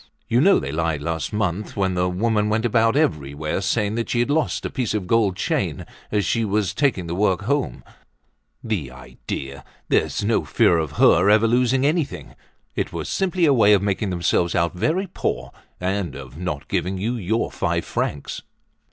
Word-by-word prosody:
"You 120 +2 +3
know 195 +5 +6
they 70 - -3
lied 80 -1 -1
last 80 0 -2
month 105 -1 -2
when 95 -1 +1
the 90 0 +1
woman 105 +3 +1
went 110 +2 0
about 115 +1 +3
everywhere 75 - -1
saying 100 +1 0
that 115 +1 -2
she 120 - 0
had 120 - 0
lost 155 0 0
a - - -3
piece 120 -5 -2
of 100 -3 -2
gold 105 -1 +2
chain - - -1 0.3
as 105 -2 +1
she 115 - +1
was 105 -3 0
taking 135 -11 +1
the 85 - -4
work 95 -1 +1
home. 140 0 -1 0.8
The 105 - -2
idea! 65 +1 -7 0.3
There's - - +1
no 110 -4 +1
fear 75 +4 +3
of 80 -2 -3
her 90 +5 +5
ever 110 +2 +5
losing 125 +3 +2
anything! 145 - -1 0.4
It - - -2
was - - -5
simply 185 -2 +1
a 145 - +5
way 105 -5 +5
of 100 -1 +3
making 100 0 -1
themselves 85 -1 +1
out 85 -1 +1
very 155 - 0
poor 65 - -3 0.3
and 95 0 -2
of 65 -1 -10
not 85 -4 -4
giving 95 +2 -1
you 110 +6 -1
your 110 0 -1
five - - -1
francs." 70 - -3
100 Hz, 185 wpm, -22 LUFS, 85-115 Hz, 0.8 s, know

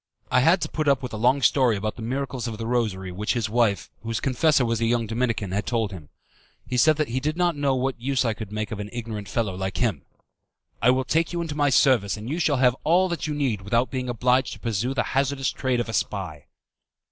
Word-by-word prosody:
I 130 - +5
had 165 +8 +4
to - - -1
put 155 -1 -3
up 140 -2 +3
with 125 - -5
a - - -3
long 125 +5 +2
story 125 -2 +4
about 110 +2 -3
the - - -9
miracles 130 +1 -3
of 110 -2 -5
the 115 - -5
Rosary 110 -6 -1
which 105 +4 -1
his 110 -3 -2
wife, 115 -4 +1
whose 115 -1 -3
confessor 135 +1 +2
was 115 -1 -1
a 115 - +2
young 115 0 +1
Dominican, 115 -3 -1
had 100 +2 -2
told 115 -3 0
him. 80 -6 -10 0.6
He 125 - -3
said 155 +5 +5
that 155 -4 -1
he 125 +3 -1
did 150 +4 -2
not 175 -2 +2
know 140 -2 +1
what 130 -1 -2
use 130 0 0
I 115 - +1
could 110 -2 -8
make 105 0 -3
of 110 - -4
an 105 0 -5
ignorant 110 -4 -6
fellow 105 -2 -1
like 95 +1 -4
him. 110 - 0 0.8
"I 120 - +4
will 130 +1 +3
take 165 +6 0
you 170 - -2
into 160 -3 -4
my 145 -1 +2
service, 120 -6 +3
and 105 +2 -8
you 165 - -2
shall 150 -4 +2
have 125 -1 +4
all 180 +4 +3
that 170 -2 -3
you 150 - -2
need 130 -9 -1
without 115 +6 0
being 130 -2 -3
obliged 125 +2 +1
to - - -11
pursue 120 +3 -2
the 125 - +1
hazardous 135 0 +1
trade 130 -2 -1
of 120 - -2
a 115 - -5
spy." 90 -8 -3
120 Hz, 250 wpm, -24 LUFS, 110-135 Hz, 0.8 s, I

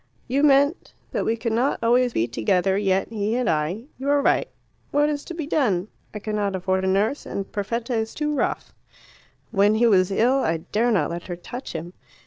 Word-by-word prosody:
"You 265 +3 +1
meant 285 +2 +3 0.2
that - - -1
we 225 +1 0
could 230 0 -2
not 250 +5 +1
always 245 +2 +3
be 115 - +1
together 180 - +1
yet, 195 -1 +1
he 215 0 -1
and 250 -2 0
I. 165 +7 0 0.2
You 275 +2 -2
are 285 0 +4
right. 400 - +2 0.4
What 295 +1 +2
is 290 -1 -3
to 345 - -7
be 320 -3 -4
done? 215 - 0 0.2
I - - -6
cannot 210 -2 -2
afford 190 +1 0
a - - 0
nurse, 205 +9 +1
and 195 - -5
Perfetta 230 +4 -3
is 225 -1 -2
too 300 0 -1
rough. 290 - -2 0.8
When 205 0 +3
he 235 +2 +3
was 190 -5 +4
ill 240 +7 +2
I 165 -10 +1
dare 220 +9 0
not 210 -6 +1
let 170 0 -6
her 175 - -4
touch 240 +9 -8
him. 170 +2 -6
220 Hz, 205 wpm, -23 LUFS, 190-255 Hz, 0.8 s, are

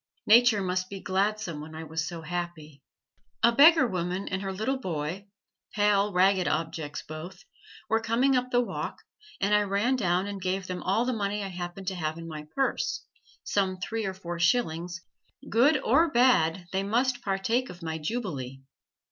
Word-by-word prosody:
Nature 225 -2 +6
must 185 0 -1
be 195 - -6
gladsome 190 -4 -1
when 155 +1 -9
I 160 - -6
was 160 0 -3
so 170 -2 -6
happy. 170 -4 -5 0.6
A 235 - +7
beggar 300 +3 +7
woman 185 -2 -2
and 185 +1 -2
her 195 -1 -3
little 220 +8 -2
boy, 180 - -4 0.5
pale, 205 -1 +3
ragged 185 0 +3
objects 155 -2 -3
both, 155 +4 -8 0.4
were 225 +1 +2
coming 245 +4 +2
up 250 0 0
the 245 -1 +3
walk, 245 - -5 0.4
and 200 +1 +1
I 210 - +5
ran 205 +6 +1
down 180 -5 +1
and 200 -1 -5
gave 185 +1 -1
them 180 -1 -5
all 210 +6 +1
the 255 - 0
money 205 -1 -2
I 195 - -4
happened 180 +1 -6
to 190 - -5
have 160 -2 -3
in 165 0 -8
my 150 -2 -7
purse 275 - -1 0.4
some 190 -2 0
three 220 +2 -3
or 190 - -4
four 175 -2 -6
shillings: 175 -3 0 0.5
good 265 +7 +5
or 315 +8 +4
bad 195 - +3
they 190 - 0
must 245 +5 0
partake 220 +6 0
of 175 -1 -10
my 160 0 -3
jubilee. 150 - -4
190 Hz, 175 wpm, -28 LUFS, 175-225 Hz, 0.6 s, A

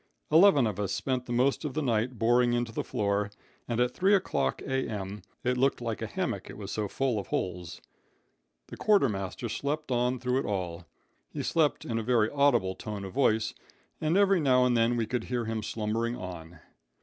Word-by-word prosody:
Eleven 160 -5 +6
of 105 -3 -2
us 100 -2 -1
spent 130 -2 -2
the - - -5
most 130 +5 +2
of 150 -4 -4
the 155 - 0
night 120 0 0
boring 120 +2 +3
into 120 -1 -1
the - - -3
floor, 100 0 -1 0.4
and 120 -1 -1
at 125 0 +2
three 195 +2 +4
o'clock 70 - 0
A.M. 105 -7 -3 0.2
it 125 0 +1
looked 135 +1 +2
like 115 -2 -4
a - - -2
hammock, - - -3
it - - -9
was 100 -2 -6
so 105 -1 -2
full 125 +1 -1
of 100 - -7
holes. 90 -2 -3 0.9
The - - -8
quartermaster 115 - +1
slept 145 +4 -3
on 125 +1 +1
through 125 +1 0
it - - -3
all. 85 -4 -3 0.4
He - - -5
slept 155 -3 +1
in 115 -1 -1
a - - -3
very 115 -2 +2
audible 130 -10 +3
tone 105 -1 -6
of 95 - -8
voice, 110 -5 +2 0.5
and 160 +4 +2
every 195 -2 +4
now 130 -4 +4
and 125 -1 +2
then 115 +1 +2
we 115 - +1
could 120 0 -3
hear 120 -2 -2
him 110 0 -2
slumbering 115 +3 -2
on. 85 -6 -8
120 Hz, 195 wpm, -29 LUFS, 105-130 Hz, 0.9 s, Eleven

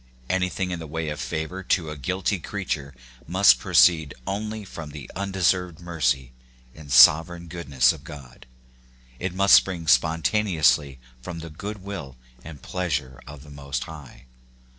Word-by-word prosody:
Anything 90 0 -1
in 90 - -3
the 80 - -8
way 80 +1 -4
of 75 - -5
favor 80 +4 -4
to 85 -4 -1
a - - -6
guilty 95 +7 -2
creature 75 -7 -5 0.3
must 90 -8 +5
proceed 80 +2 +4
only 105 +1 -4
from 80 -5 -8
the 75 -2 -10
undeserved 90 -3 0
mercy 65 -7 -1 0.4
and 75 -3 -12
sovereign 80 +7 +6
goodness 70 -7 +1
of - - -13
God; 65 -5 -12 0.7
it 95 0 -3
must 100 +1 +4
spring 90 -4 +4
spontaneously 80 -1 +2 0.2
from 85 +6 -7
the 80 -1 -8
goodwill 95 -6 -7 0.3
and 75 -3 -11
pleas 90 -6 -1
ure 65 -4 -11
of 70 -1 -11
the 75 - -14
Most 70 -2 -5
High. 75 -5 -12
80 Hz, 145 wpm, -24 LUFS, 70-90 Hz, 0.7 s, sovereign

